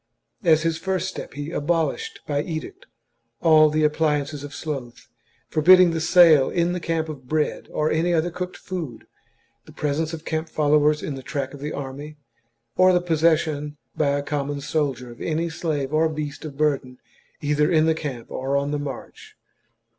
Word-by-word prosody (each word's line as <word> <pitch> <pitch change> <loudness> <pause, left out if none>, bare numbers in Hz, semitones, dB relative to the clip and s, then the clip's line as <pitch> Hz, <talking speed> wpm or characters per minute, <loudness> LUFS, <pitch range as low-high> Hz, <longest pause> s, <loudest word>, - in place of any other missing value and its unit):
As 160 -3 +4
his 165 -1 0
first 190 -1 -1
step, 190 - -7
he 145 +2 -5
abolished 170 - -1
by 145 -1 0
edict 160 0 -6 0.5
all 155 -2 +6
the 155 +1 +1
appliances 150 -2 0
of 145 - -7
sloth, 135 -6 -6 0.4
forbidding 180 +3 +6
the 165 -1 -2
sale 160 -5 +6
in 170 0 +1
the 180 - -2
camp 165 -1 -1
of 140 -5 -9
bread 155 +2 -1
or 155 0 0
any 165 +3 +1
other 170 +1 +1
cooked 180 +1 -5
food, 165 -11 -6 0.6
the - - -14
presence 150 +2 -2
of 165 -1 -7
camp 160 0 -2
followers 150 0 +2
in 150 - -3
the 135 - -7
track 135 +1 -4
of 145 - -9
the 150 +2 -4
army, 145 +2 -7 0.6
or 185 0 +6
the 180 - +4
possession 155 -3 +1 0.2
by 150 - +1
a 145 - -3
com 145 -1 -2
mon 145 0 -3
soldier 140 -4 -2
of 120 - -13
any 165 +1 -1
slave 150 -4 -2
or 160 +1 +3
beast 150 -1 -5
of 145 -3 -8
burden 140 -4 0 0.4
either 150 +2 +1
in 160 -1 +4
camp 140 -7 -6
or 135 +2 -1
on 140 +1 -1
the 150 - -1
march. 430 - -8
155 Hz, 175 wpm, -23 LUFS, 145-165 Hz, 0.6 s, all